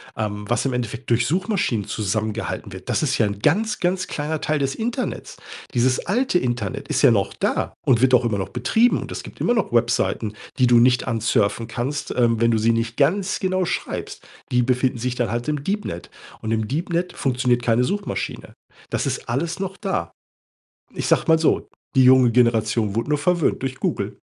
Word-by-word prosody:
ähm, 105 -1 -3
was 120 +3 0
im 130 - 0
Endeffekt 120 0 -4
durch 120 0 +3
Suchmaschinen 175 - 0
zusammengehalten 110 0 -3
wird, 95 0 -10
das - - +1
ist 140 - +1
ja 110 - +3
'n 100 0 -3
ganz, 215 - +1
ganz 180 +1 0
kleiner 150 +1 -3
Teil 155 -1 0
des 135 0 -1
Internets. 240 +3 -4 0.4
Dieses 125 +1 +1
alte 230 0 +1
Internet 120 -5 -3
ist - - +1
ja - - +7
noch - - +1
da - - -1
und 120 -3 +4
wird 130 0 +4
auch 125 0 +6
immer 110 -4 0
noch 95 - -3
betrieben 175 - +2
und - - -8
es - - -5
gibt - - -11
immer 240 - +2
noch 225 - -1
Webseiten, 115 -2 +1 0.3
die 125 - +5
du 120 -1 +6
nicht 125 +1 +3
ansurfen 115 -1 0
kannst, 140 +4 -3
ähm, 115 -2 +2
wenn 115 0 +3
du 115 - +2
sie 115 +2 +3
nicht 115 0 -2
ganz 185 +7 +1
genau 185 -1 0
schreibst. - - -4 0.3
Die 125 0 +3
befinden 125 +1 +1
sich 125 +1 -2
dann 120 -3 -1
halt 120 +3 -3
im 150 -2 -2
Deepnet 195 - -3 0.3
und 110 - -3
im 110 -1 0
Deepnet 170 +4 -2
funktioniert 125 -2 +1
keine 115 +1 +3
Suchmaschine. 200 +9 -3 0.4
Das - - -1
ist - - -3
alles 165 +8 -2
noch 195 0 -4
da. 130 - -2 0.8
Ich - - -3
sage - - +3
mal 160 - +6
so, 160 - +1 0.3
die 130 -2 +5
junge 130 -1 +6
Generation 115 -3 +2
wurde 115 +6 -1
nur 150 - +2
verwöhnt 170 -3 +1
durch 130 -1 -3
Google. - - -3
125 Hz, 195 wpm, -22 LUFS, 115-160 Hz, 0.8 s, ja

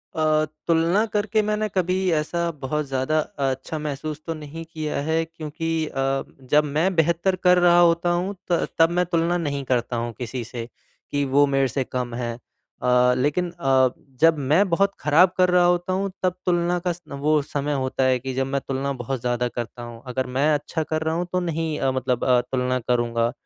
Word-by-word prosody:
अ, 155 -1 +2 0.2
तुलना 170 +6 +3
करके 215 +1 +1
मैंने 215 0 -1
कभी 185 -1 +1 0.2
ऐसा 170 +2 0
बहुत 150 +3 -1
ज़्यादा 135 +3 0 0.3
अच्छा 135 +4 -2
महसूस 150 +1 -4
तो 165 - -1
नहीं 155 +1 -8
किया 155 -2 -3
है 160 +2 +1
क्योंकि 165 0 -6 0.2
अ, 135 0 -1 0.3
जब 150 +1 +5
मैं 185 +5 +2
बेहतर 170 +3 +2
कर 180 0 +6
रहा 175 0 +5
होता 170 0 +4
हूँ, 180 +4 -1 0.2
त 170 - +2
तब 165 - +6
मैं 180 +1 +1
तुलना 170 0 +1
नहीं 140 -4 -2
करता 120 -1 0
हूँ 120 0 -3
किसी 125 0 -4
से 115 0 -6 0.5
कि 145 0 0
वो 145 +1 +6
मेरे 135 -1 +2
से 130 +3 -1
कम 125 -1 -4
हैं। 120 -1 -3
अ, 125 +1 0
लेकिन 150 +7 0
अ, 135 -6 +3 0.3
जब 165 -1 +6
मैं 155 +9 +3
बहुत 195 +3 +2
ख़राब 165 +5 +5
कर 180 0 +4
रहा 180 0 +4
होता 175 +1 +1
हूँ, 195 0 -1
तब 185 - +2
तुलना 175 0 +1
का - - +3
स 175 - -14
वो 150 +2 +1
समय 145 0 -3
होता 130 -1 -1
है 130 -1 +3
कि 130 +1 -5
जब 135 +1 0
मैं 140 0 -1
तुलना 135 +1 -1
बहुत 130 +1 -3
ज़्यादा 125 0 0
करता 120 +1 -6
हूँ। 120 -1 -9
अगर 130 +1 -2
मैं 150 +3 +3
अच्छा 150 +2 -2
कर 155 0 -2
रहा 160 0 -1
हूँ, 175 +1 -1
तो 185 - +1
नहीं 165 -3 -2
अ, 135 - +1
मतलब 130 -2 -1
अ, 125 -1 +5
तुलना 130 -1 0
करूँगा 120 -1 0
150 Hz, 200 wpm, -23 LUFS, 130-170 Hz, 0.5 s, कर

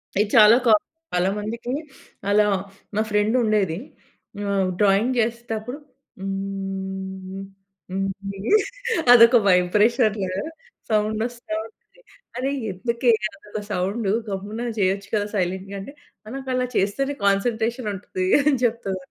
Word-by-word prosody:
ఇది 205 +2 +2
చాలా 215 +1 +8
క - - +2 0.5
చాలా 180 +1 +2
మందికి, 230 +3 -4 0.6
అలా 210 +1 +5 0.5
మా 215 - +2
ఫ్రెండ్ 210 +2 +2
ఉండేది. 205 -7 +1 0.7
ఆహ్, 195 -2 +1
డ్రాయింగ్ 205 +5 +3
చేసేటప్పుడు 235 +1 -2 0.4
హ్మ్, 195 -1 -5 0.5
హ్మ్, 195 +1 -1 1.0
అదొక 235 0 +8
వైబ్రేషన్ 210 +5 +3 0.7
సౌండ్ 215 0 +1
వస్తా 240 -2 -7
ఉంటది. 225 - -20 0.4
అరె! 265 +2 -1 0.2
ఎందుకే 235 +5 +1 0.2
అదొక 210 -8 -7
సౌండ్ 200 +4 -1 0.2
గమ్మున 205 +3 -4 0.2
చేయొచ్చు 195 +1 +1
కదా! 205 -1 0
సైలెంట్‌గా 190 +1 -2
అంటే, 275 +8 -9 0.3
"ఆ - - -15
నాకు 270 -1 -6
అలా 255 0 0
చేస్తేనే 275 +9 0
కాన్సంట్రేషన్ 225 +3 +1
ఉంటది." 185 -1 -4 0.2
అని 290 0 +3
చెప్తద‌ 225 -5 -1
210 Hz, 115 wpm, -23 LUFS, 195-235 Hz, 1.0 s, చాలా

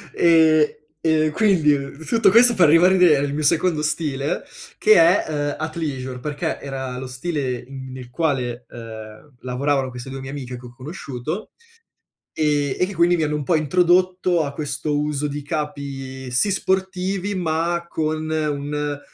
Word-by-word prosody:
e 160 -2 +5 0.3
e 155 -1 +2
quindi 165 -8 +3 0.3
tutto 230 +4 +3
questo 235 +4 +6
per 180 -5 +5
ribadire 175 0 +5
il 140 0 -1
mio 155 +1 -2
secondo 160 +1 +2
stile, 150 -2 -2 0.3
che 215 - +5
è, 170 +2 +5
uhm, 145 -1 -2
Athleisure, 145 -5 -4
perché 145 +2 -3
era 130 -2 -5
lo 130 +1 -6
stile 130 -1 -3
in 130 0 -9
nel 130 -1 -9
quale, 125 -5 -2
uhm, 110 +3 -10
lavoravano 135 +1 -1
queste 125 +1 -8
2 135 0 -6
mie 135 0 -7
amiche 130 -3 -6
che 125 - -13
ho 120 - -11
conosciuto 140 - -6 0.8
e 145 -3 0
e 180 - +2
che 200 - -7
quindi 170 +1 +3
mi 160 - 0
hanno 150 0 -1
un 150 - -2
po' 165 - +2
introdotto 180 +2 +2
a 140 - -4
questo 145 +1 -3
uso 150 0 -1
di 145 0 -4
capi, 140 -3 -5
sì 130 +12 +2
sportivi, 190 +1 -1
ma 170 -1 -1
con 155 0 -2
un 150 -1 -2
150 Hz, 155 wpm, -22 LUFS, 135-170 Hz, 0.8 s, questo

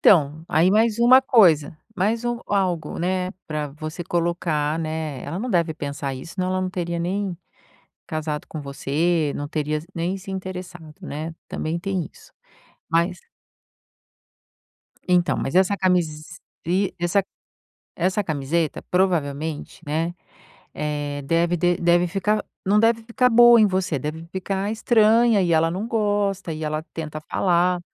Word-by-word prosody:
então, 155 -3 +4
aí 165 +4 +4
mais 220 +1 +3
um 235 - +4 0.2
coisa. 160 - +4 0.2
Mais 220 +5 0
um 240 0 -1
algo, 185 -5 -1
né, 185 +1 -1 0.2
pra 150 -1 -3
você 155 +4 -6
colocar, 165 -3 0
né, 155 -4 -4
ela 165 +6 -4
não 250 +4 -3
deve 170 -4 +2
pensar 140 -2 -4
isso, 130 +7 -9
senão 185 -1 -1
ela 185 0 0
não 185 - -1
teria 170 -2 -3
nem 185 +1 -2 0.7
casado 155 -1 -3
com 155 - -6
você, 150 +3 0
não 145 - -4
teria 155 -1 -1
is 155 - -11
nem 175 +3 -1
se 195 +1 -9
interessado, 180 -4 -7
né, 160 +3 -5
também 165 +2 -3
tem 185 -2 -2
isso. - - -19 0.6
Mas 170 +2 +1 1.9
Então, 180 -1 +3
mas 135 - -3
essa 190 +2 +4
camise 175 -5 +1 0.8
essa 175 +3 +2 0.7
essa 185 +4 0
camiseta, 155 0 -1
provavelmente, 160 -5 -1
né, 165 +4 -1 0.6
eh, 145 -1 -3
deve 170 +4 +1
dev 175 +1 +1
deve 175 +1 +4
ficar 205 +4 0 0.2
não 200 +2 +3
deve 230 0 +3
ficar 245 +2 +2
boa 240 0 +8
em 215 - +6
você, 185 -6 0
deve 155 +4 -5
ficar 195 +2 -2
estranha 225 -1 +4
e 170 -2 +1
ela 165 +1 +3
não 190 +6 -3
gosta 205 -5 0
e 155 0 -5
ela 155 0 -2
tenta 155 -1 -5
falar. 180 +2 +1
175 Hz, 145 wpm, -23 LUFS, 155-190 Hz, 1.9 s, boa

